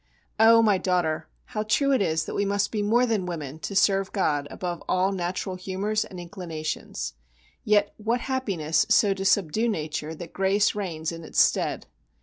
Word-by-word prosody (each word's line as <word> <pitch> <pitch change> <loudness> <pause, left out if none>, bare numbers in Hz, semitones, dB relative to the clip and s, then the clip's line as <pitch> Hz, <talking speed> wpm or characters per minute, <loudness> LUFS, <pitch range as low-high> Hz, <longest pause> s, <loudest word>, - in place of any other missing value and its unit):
Oh! 230 +1 +7
my 205 -4 +3
daughter, 175 -4 0 0.3
how 215 - -1
true 245 +6 +2
it 265 - +3
is 160 -3 0
that - - -6
we 200 - 0
must 200 0 0
be 215 - -1
more 230 +5 +3
than 215 -6 -1
women 155 -4 -5
to 200 - -5
serve 195 -1 +3
God 145 -7 0
above 175 -2 -5
all 185 +1 +2
natural 180 0 -3
humours 195 +4 -1
and 185 - -10
inclinations. 165 - -5 0.5
Yet 205 -1 +2
what 230 +3 -1
happiness 190 - 0
so 205 -2 +4
to 195 0 -5
subdue 200 +3 +2
nature 155 -4 -3
that 165 +1 -9
grace 195 +2 +2
reigns 170 -6 -3
in 165 0 -8
its - - -2
stead! - - +2
190 Hz, 175 wpm, -26 LUFS, 165-210 Hz, 0.5 s, Oh